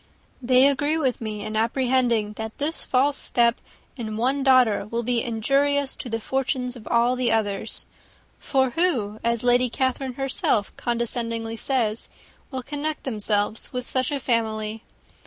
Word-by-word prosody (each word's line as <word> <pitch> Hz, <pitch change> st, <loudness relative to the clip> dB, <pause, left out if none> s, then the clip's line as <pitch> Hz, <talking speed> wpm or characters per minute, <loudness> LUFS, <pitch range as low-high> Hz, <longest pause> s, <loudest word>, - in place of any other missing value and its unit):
They 255 Hz, +2 st, +5 dB
agree 290 Hz, +3 st, +1 dB
with 265 Hz, -7 st, 0 dB
me 215 Hz, -2 st, -4 dB
in 215 Hz, -, -4 dB
apprehending 235 Hz, -2 st, +1 dB
that 220 Hz, +1 st, -6 dB
this 305 Hz, +3 st, 0 dB
false 275 Hz, +2 st, +2 dB
step 235 Hz, -1 st, +2 dB, 0.3 s
in 220 Hz, -5 st, -5 dB
one 265 Hz, +5 st, +1 dB
daughter 255 Hz, -7 st, +4 dB
will 235 Hz, +2 st, -2 dB
be 240 Hz, 0 st, +1 dB
injurious 275 Hz, +4 st, +1 dB
to 245 Hz, -, -6 dB
the 225 Hz, 0 st, -2 dB
fortunes 255 Hz, +1 st, -2 dB
of 225 Hz, -4 st, -11 dB
all 235 Hz, +2 st, +3 dB
the 250 Hz, -2 st, +1 dB
others: 215 Hz, -1 st, -1 dB, 0.5 s
for 265 Hz, -2 st, +1 dB
who, 240 Hz, -, 0 dB
as 235 Hz, 0 st, 0 dB
Lady 245 Hz, 0 st, +3 dB
Catherine 260 Hz, +1 st, -1 dB
herself 260 Hz, -5 st, 0 dB
condescendingly 230 Hz, -1 st, -2 dB
says, 230 Hz, -3 st, 0 dB, 0.4 s
will 260 Hz, -2 st, -5 dB
connect 295 Hz, +3 st, -4 dB
themselves 210 Hz, -3 st, -1 dB
with 250 Hz, -1 st, -3 dB
such 260 Hz, +3 st, 0 dB
a 285 Hz, -, -1 dB
family? 220 Hz, -3 st, -1 dB
245 Hz, 150 wpm, -24 LUFS, 225-265 Hz, 0.5 s, They